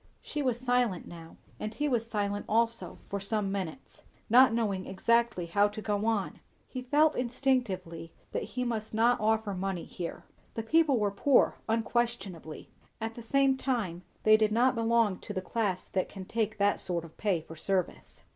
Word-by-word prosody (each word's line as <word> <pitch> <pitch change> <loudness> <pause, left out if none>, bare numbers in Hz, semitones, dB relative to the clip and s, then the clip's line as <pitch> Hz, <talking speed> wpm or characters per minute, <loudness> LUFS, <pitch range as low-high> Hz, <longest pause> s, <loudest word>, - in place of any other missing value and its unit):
She 300 - -4
was 250 -4 0
silent 245 -6 +1
now, 165 -1 -11 0.2
and 215 +1 -4
he 295 - 0
was 235 -4 0
silent 205 -2 -2
also, 230 +1 0
for 200 - -3
some 200 0 -1
minutes; 195 +5 -5 0.3
not 255 +1 +8
knowing 205 -5 -1
exactly 230 -1 +1
how 200 +5 +3
to 205 - -7
go 210 +1 -1
on. 220 -4 -1 0.3
He 255 - -6
felt 295 +5 +3
instinctively 230 -10 -1 0.2
that - - -2
he 250 - -3
must 220 -3 -3
not 235 +2 +4
offer 220 -1 +1
money 190 -2 -3
here. 170 -2 -6 0.3
The 225 - -2
people 310 +2 +3
were 205 -2 +1
poor 265 +6 +3
unquestionably; 225 -8 -2 0.3
at 225 0 -3
the 235 - -9
same 270 +3 +2
time 225 -11 -2 0.2
they 215 0 +7
did 215 -1 +2
not 245 +4 +4
belong 230 -4 +2
to 205 - -7
the 190 - -1
class 200 -4 -1
that 185 - -1
can 190 -2 -8
take 220 +1 -1
that 205 0 +2
sort 170 -2 -2
of 160 - -15
pay 200 -5 +1
for 160 +1 -11
service. 185 +2 -3
220 Hz, 175 wpm, -30 LUFS, 195-240 Hz, 0.3 s, not